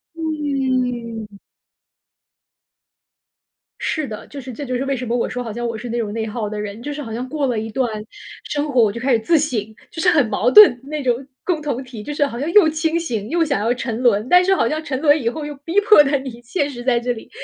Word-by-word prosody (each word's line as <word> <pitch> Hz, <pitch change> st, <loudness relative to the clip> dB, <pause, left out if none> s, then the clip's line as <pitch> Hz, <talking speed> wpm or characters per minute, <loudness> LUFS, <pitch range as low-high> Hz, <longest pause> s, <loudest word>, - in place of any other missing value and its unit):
嗯。 255 Hz, -8 st, -2 dB, 2.4 s
是 310 Hz, -3 st, -2 dB
的， 215 Hz, -1 st, -8 dB
就 285 Hz, -, -9 dB
是 255 Hz, -2 st, -8 dB
这 285 Hz, +5 st, -6 dB
就 255 Hz, -, -3 dB
是 255 Hz, +2 st, -1 dB
为 275 Hz, 0 st, 0 dB
什 250 Hz, 0 st, -5 dB
么 235 Hz, -, 0 dB
我 235 Hz, -, -1 dB
说 250 Hz, 0 st, -4 dB
好 225 Hz, -, -5 dB
像 240 Hz, +2 st, -4 dB
我 230 Hz, -1 st, -4 dB
是 240 Hz, +2 st, -7 dB
那 235 Hz, -, -2 dB
种 215 Hz, -3 st, -2 dB
内 225 Hz, 0 st, -2 dB
耗 215 Hz, -1 st, -4 dB
的 210 Hz, 0 st, -5 dB
人， 210 Hz, +2 st, -6 dB
就 290 Hz, +3 st, -5 dB
是 295 Hz, -, -6 dB
好 225 Hz, -5 st, -7 dB
像 245 Hz, +3 st, -4 dB
过 295 Hz, 0 st, -1 dB
了 235 Hz, -4 st, -1 dB
一 220 Hz, -, -5 dB
段 255 Hz, -1 st, 0 dB, 0.5 s
生 295 Hz, 0 st, -2 dB
活 250 Hz, -3 st, +4 dB
我 210 Hz, -, +2 dB
就 235 Hz, -, -6 dB
开 265 Hz, +2 st, +1 dB
始 230 Hz, -, +3 dB
自 320 Hz, +9 st, +3 dB
省， 280 Hz, -7 st, 0 dB, 0.3 s
就 325 Hz, -, -5 dB
是 360 Hz, -, +4 dB
很 290 Hz, -9 st, +3 dB
矛 240 Hz, +3 st, +1 dB
盾， 415 Hz, -11 st, +8 dB
那 300 Hz, +2 st, -4 dB
种 250 Hz, +1 st, 0 dB, 0.2 s
共 340 Hz, -4 st, -1 dB
同 275 Hz, -3 st, -3 dB
体， 240 Hz, -4 st, -9 dB
就 295 Hz, -, -5 dB
是 290 Hz, 0 st, +2 dB
好 240 Hz, -4 st, -5 dB
像 300 Hz, +5 st, -2 dB
又 410 Hz, -7 st, +7 dB
清 320 Hz, +1 st, 0 dB
醒， 225 Hz, -10 st, -3 dB
又 335 Hz, +2 st, +2 dB
想 285 Hz, -8 st, 0 dB
要 230 Hz, +3 st, +2 dB
沉 240 Hz, -2 st, -4 dB
沦， 230 Hz, -2 st, +2 dB
但 360 Hz, 0 st, +6 dB
是 385 Hz, +1 st, +3 dB
好 -, -, +2 dB
像 310 Hz, +1 st, -2 dB
沉 265 Hz, -3 st, -3 dB
沦 300 Hz, -1 st, +4 dB
以 230 Hz, -, +1 dB
后 300 Hz, +5 st, -5 dB
又 295 Hz, -, -5 dB
逼 340 Hz, +5 st, +3 dB
迫 425 Hz, -7 st, +7 dB
得 285 Hz, 0 st, +1 dB
你 255 Hz, -3 st, -8 dB
现 285 Hz, +5 st, -2 dB
实 240 Hz, -3 st, -8 dB
在 245 Hz, -2 st, +2 dB
这 245 Hz, +1 st, -2 dB
里， 225 Hz, -, -11 dB
255 Hz, 270 characters per minute, -20 LUFS, 235-300 Hz, 2.4 s, 盾